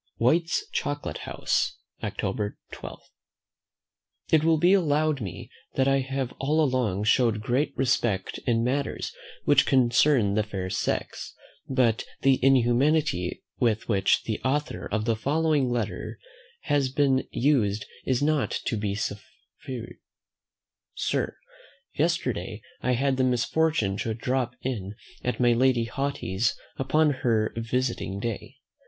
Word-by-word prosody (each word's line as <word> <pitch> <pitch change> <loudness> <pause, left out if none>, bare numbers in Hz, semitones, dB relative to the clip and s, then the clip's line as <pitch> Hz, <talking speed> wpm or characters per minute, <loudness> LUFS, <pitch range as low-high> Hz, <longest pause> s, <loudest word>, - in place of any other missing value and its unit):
White's 165 +8 +2
Chocolate 145 0 -3
House, - - 0 0.3
October 105 -1 -2
12. - - -8 1.3
It 155 -1 +5
will 165 0 +4
be 175 +4 +4
allowed 155 -5 +2
me 95 -5 -7 0.2
that 135 0 +2
I 135 0 +3
have 135 -1 -3
all 155 +3 +2
along 125 -8 0
showed 110 0 +3
great 125 +7 0
respect 120 -7 0
in 115 -1 +2
matters 135 +3 -1 0.3
which - - +5
concern 125 -3 +4
the 110 - +2
fair 95 -3 -4
sex; 95 - -2 0.3
but 125 -4 +2 0.2
the 135 0 +3
inhumanity 130 - +2 0.2
with 110 -3 +1
which 100 -4 +2
the 110 - -3
author 145 +3 -1
of 110 +1 -1
the 115 -1 +2
following 145 +2 +1
letter 120 -3 -3 0.4
has 140 -2 +1
been 135 -1 +2
used 110 -7 +1 0.2
is 130 +1 0
not 150 -1 +2 0.2
to 115 - -1
be 105 -1 -2
suffered: 120 +3 -7 1.0
"Sir, - - -1 0.6
"Yesterday 125 - -1 0.2
I 125 - +1
had 135 +2 +1
the 130 - +2
misfortune 125 -4 +1
to 110 0 -2
drop 125 +1 -1
in 105 -6 -3 0.3
at 125 - -2
my 120 -1 +4
Lady 125 0 +3
Haughty's 115 -5 -1 0.2
upon 150 +3 +3
her 110 -3 +1
visiting 115 -4 -2
day. 115 0 -4
125 Hz, 125 wpm, -26 LUFS, 110-140 Hz, 1.3 s, It